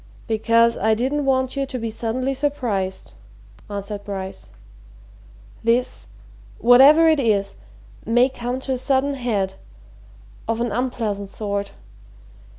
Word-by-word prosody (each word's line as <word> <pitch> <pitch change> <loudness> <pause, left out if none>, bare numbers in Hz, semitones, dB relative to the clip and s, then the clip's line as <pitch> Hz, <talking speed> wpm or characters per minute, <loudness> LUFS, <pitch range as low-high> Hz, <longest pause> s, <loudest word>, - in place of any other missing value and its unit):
"Because 230 +1 +2
I 220 +1 +2
didn't 270 +5 -1
want 260 -1 +1
you 275 -1 -1
to 260 - -5
be 230 -2 -4
suddenly 245 +4 -2
surprised," 245 -9 -2 0.6
answered 205 0 -5
Bryce. 190 -2 -6 1.1
"This 235 +2 0 0.5
whatever 275 +7 +7
it 315 -2 +4
is 200 -5 0 0.5
may 240 +3 +3
come 250 -1 -4
to 265 - -4
a 255 - -2
sudden 275 +1 +1
head 215 -8 -1 0.9
of 225 0 -1
an 240 -1 -1
unpleasant 215 -4 -2
sort. 200 -1 -4
235 Hz, 120 wpm, -22 LUFS, 210-260 Hz, 1.1 s, whatever